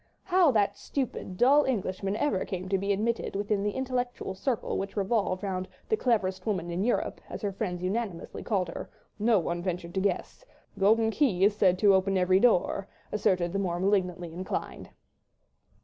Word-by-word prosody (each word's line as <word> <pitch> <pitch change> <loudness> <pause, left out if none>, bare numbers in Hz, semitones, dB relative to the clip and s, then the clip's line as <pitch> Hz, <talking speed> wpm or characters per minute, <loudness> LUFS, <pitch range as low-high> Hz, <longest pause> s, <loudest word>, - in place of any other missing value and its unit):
How 365 -3 +4
that 205 -2 +1
stupid, 235 -9 -4
dull 280 +6 +5
Englishman 195 -5 -1
ever 215 -7 0
came 185 -1 -5
to 195 0 +1
be 200 +1 -1
admitted 220 +3 -1
within 205 0 0
the 205 - 0
intellectual 250 -5 -2
circle 235 +5 -2
which 195 +2 -5
revolved 200 -2 0
round 185 -2 -2 0.2
"the 435 - +4
cleverest 205 - 0
woman 175 -5 -1
in 175 +3 -1
Europe," 240 - -1
as - - -7
her 200 - 0
friends 180 -3 -4
unanimously 195 -2 -3
called 195 -5 -1
her, - - -7 0.3
no 220 +1 +4
one 175 -1 -1
ventured 175 -1 -4
to 190 - 0
guess—a 200 - -5
golden 220 +3 +4
key 220 -8 +2
is 205 +1 +4
said 185 -3 +3
to 200 +1 +5
open 190 0 +2
every 185 +1 +4
door, 200 -3 +2 0.2
asserted 185 -4 +1
the 200 - 0
more 175 -3 -1
malignantly 180 -3 0
inclined. 185 +2 -5
195 Hz, 175 wpm, -28 LUFS, 185-225 Hz, 0.3 s, dull